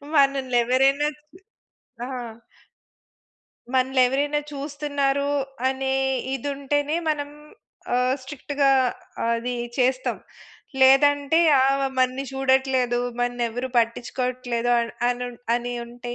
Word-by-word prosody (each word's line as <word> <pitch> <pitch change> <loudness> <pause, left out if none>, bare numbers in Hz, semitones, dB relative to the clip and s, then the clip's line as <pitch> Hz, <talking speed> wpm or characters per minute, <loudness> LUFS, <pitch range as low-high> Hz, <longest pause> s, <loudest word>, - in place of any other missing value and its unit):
మనల్ని 275 -3 +3
ఎవరైనా 270 +4 +3 1.0
ఆ! - - -7 1.6
మనల్ని 260 0 +2
ఎవరైనా 290 +3 0
చూస్తున్నారు 285 -1 -1 0.4
అనే 265 0 -1 0.4
ఇది 270 +2 -4
ఉంటేనే, 290 +2 -1
మనం 290 -1 -2 0.7
ఆహ్, 250 +1 +2
స్ట్రిక్ట్‌గా 280 +1 -1 0.6
అది 235 +2 -2 0.2
చేస్తాం. 255 0 +1 0.6
లేదంటే 285 +3 +5 0.2
ఆమె 275 +1 +2
మనల్ని 255 +1 +1
చూడట్లేదు. 265 -2 +1 0.2
మనల్ని 245 0 0
ఎవరు 245 +3 -4
పట్టించుకోవట్లేదు 245 +1 -1 0.4
అని 245 0 -2 0.3
అని 245 0 -2
ఉంటే 240 0 -7
265 Hz, 90 wpm, -24 LUFS, 250-280 Hz, 1.6 s, లేదంటే